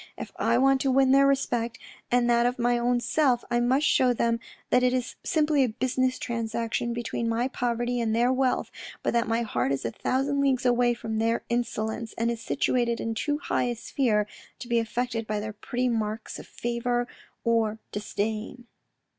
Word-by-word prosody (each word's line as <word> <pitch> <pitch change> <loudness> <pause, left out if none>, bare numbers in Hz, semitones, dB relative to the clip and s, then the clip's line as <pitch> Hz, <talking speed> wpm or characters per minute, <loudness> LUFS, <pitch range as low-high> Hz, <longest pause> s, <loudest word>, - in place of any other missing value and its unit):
If - - -7
I 230 +1 +2
want 270 +1 +4
to 270 - +1
win 265 0 +4
their 275 +1 +6
respect 240 -4 0 0.3
and 245 0 +3
that 235 0 +4
of 250 - -2
my 240 0 +2
own 245 +1 +2
self, 255 -1 +1
I 240 - +3
must 260 +5 +2
shew 250 -2 +3
them 230 0 +1 0.3
that 250 - +5
it 250 0 +3
is 255 -1 -1
simply 305 -5 +2
a 250 - +1
business 255 +2 0
transaction 230 0 -2
between 235 0 -2
my 230 +2 +1
poverty 240 -1 -1
and 225 -1 0
their 240 +2 +3
wealth, 260 -1 0 0.3
but - - 0
that 235 -1 +1
my 230 +1 +1
heart 210 -10 -1
is 135 - -2
a 115 - -1
thousand 275 - 0
leagues 265 -2 +1
away 245 -1 +3
from 220 -1 -3
their 230 +1 +1
insolence, 230 -1 -2
and 230 +1 +1
is 230 -1 -5
situated 240 -3 0
in 225 - -2
too 290 +6 -1
high 290 - -1
a 240 -1 -1
sphere 225 -3 0 0.3
to 240 - -9
be 235 -1 +2
affected 230 0 -2
by 210 0 -1
their 215 +1 -5
petty 245 +4 -2
marks 220 -2 -2
of - - -11
favour 240 +1 -2 0.4
or 225 -2 +1
disdain." 215 +3 -3
240 Hz, 190 wpm, -27 LUFS, 230-255 Hz, 0.4 s, their